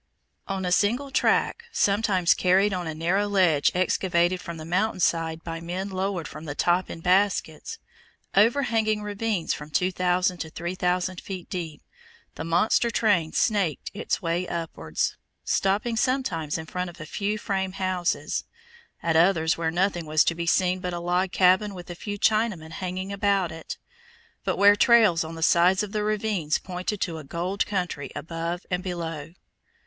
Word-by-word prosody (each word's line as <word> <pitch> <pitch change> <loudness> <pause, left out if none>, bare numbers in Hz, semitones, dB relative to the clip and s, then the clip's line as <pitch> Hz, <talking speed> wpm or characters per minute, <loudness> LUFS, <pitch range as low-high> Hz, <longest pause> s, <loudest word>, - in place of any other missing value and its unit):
On 195 -1 -3
a 180 - -1
single 240 +9 +1
track, 465 - +1
sometimes 200 - +3
carried 190 +2 +3
on 180 -2 -3
a 160 - -4
narrow 180 +6 +1
ledge 180 -8 +3
excavated 180 -1 +1
from 170 -1 -7
the 155 - -8
mountain 185 +5 0
side 165 -2 0
by 165 -1 -5
men 180 +4 -4
lowered 190 -3 -2
from 155 +1 -9
the 145 -2 -5
top 175 +3 +1
in 165 - -7
baskets, 185 - +1 0.6
overhanging 220 -1 +2
ravines 205 -3 -1
from 150 +1 -8
2,000 180 +2 +1
to 160 - -4
3,000 180 +2 -2
feet 185 -3 -7
deep, 165 -5 -5 0.5
the - - -6
monster 175 +8 +2
train 180 -9 +2
SNAKED 200 - 0
its 205 -1 -2
way 170 +2 -1
upwards, 160 - -3 0.3
stopping 205 +4 +1
sometimes 220 - 0
in 160 - -6
front 180 +2 -4
of 175 - -14
a 155 - -7
few 205 +6 -2
frame 190 -3 -2
houses, 185 -2 -1 0.6
at 165 -1 +1
others 160 -1 +4
where 165 -1 -1
nothing 175 -1 0
was 155 0 +4
to - - +1
be 170 0 -4
seen 185 +2 +2
but 180 -1 -4
a 175 - -3
log 180 +2 0
cabin 190 +2 +3
with 175 -1 -9
a - - -4
few 205 +4 -6
Chinamen 215 -7 +1
hanging 185 +3 -4
about 200 -3 +1
it, 160 0 -7 0.7
but - - -1
where 205 +1 +7
trails 215 -8 +5
on 160 +1 -7
the 165 - -4
sides 180 +4 +4
of 205 - -6
the 210 - -1
ravines 210 -7 0
pointed 185 +2 -4
to 165 -3 -2
a - - -9
gold 175 +7 -2
country 180 -7 -3
above 170 +2 -4
and 180 0 0
below. 165 -3 -5
180 Hz, 165 wpm, -25 LUFS, 165-200 Hz, 0.7 s, where